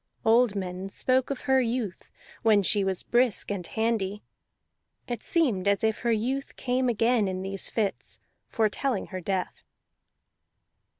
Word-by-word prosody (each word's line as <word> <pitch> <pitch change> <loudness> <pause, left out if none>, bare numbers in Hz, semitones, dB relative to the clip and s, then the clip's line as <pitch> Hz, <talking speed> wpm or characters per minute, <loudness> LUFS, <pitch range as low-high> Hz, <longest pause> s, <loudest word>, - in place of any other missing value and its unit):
Old 225 -1 +4
men 185 0 -4
spoke 255 +5 +1
of 275 -2 -3
her 265 -1 +3
youth, 230 -5 -3 0.3
when 215 -3 +4
she 200 +2 +3
was 190 -1 -2
brisk 240 -5 +2
and 185 -4 -3
handy; 220 -3 -1 0.8
it 240 -3 -4
seemed 240 - +1
as 200 +1 +2
if 220 -1 +1
her 235 - 0
youth 255 +5 -1
came 255 0 0
again 230 -1 +2
in 185 0 -3
these 195 0 -3
fits, 210 -4 -2 0.3
foretelling 225 +1 0
her 185 - -4
death. 185 +1 -3
220 Hz, 140 wpm, -27 LUFS, 195-245 Hz, 0.8 s, Old